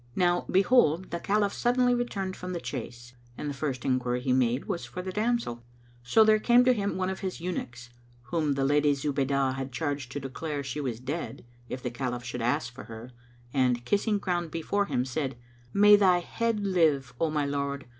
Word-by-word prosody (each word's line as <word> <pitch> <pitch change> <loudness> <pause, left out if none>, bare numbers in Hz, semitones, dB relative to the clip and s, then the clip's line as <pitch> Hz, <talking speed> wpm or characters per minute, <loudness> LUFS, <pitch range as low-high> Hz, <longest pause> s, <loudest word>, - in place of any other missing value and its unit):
Now, 175 -1 +2
behold, 190 -4 +3
the 170 - -2
Caliph 200 +2 +1
suddenly 245 0 +2
returned 200 -6 -2
from 180 0 -6
the 175 - -2
chase, 120 -4 -7 0.2
and - - -4
the 145 - -2
first 135 -3 -3
enquiry 125 -1 +1
he 125 0 0
made 125 0 +1
was 170 - -3
for 180 - -6
the 185 - -4
damsel. 215 - -1 0.4
So 125 - +5
there 215 0 +5
came 245 +3 +5
to 255 - +6
him 200 -4 -2
one 185 0 0
of 190 - -5
his 190 -4 -4
eunuchs, 120 -9 -5 0.3
whom 150 +3 0
the 135 0 0
Lady 145 +1 +3
Zubaydah 140 -1 0
had 135 0 -5
charged 140 -1 -3
to 145 - -3
declare 145 +2 -4
she 140 +2 -4
was 120 -5 -3
dead, 145 +4 -5 0.2
if 125 - -5
the 125 - -2
Caliph 125 -1 -3
should 120 0 -5
ask 120 +1 0
for 125 - -10
her 115 +2 -9 0.4
and, 125 -3 +1
kissing 205 - +1
ground 175 -4 -2
before 200 +5 -1
him, 125 -7 0
said, 135 0 -3 0.3
"May 205 +4 +7
thy 190 -3 +5
head 225 +4 -1
live, 155 -9 +2
O 165 - +2
my 150 -2 0
lord! 140 0 -2
145 Hz, 195 wpm, -28 LUFS, 130-190 Hz, 0.4 s, May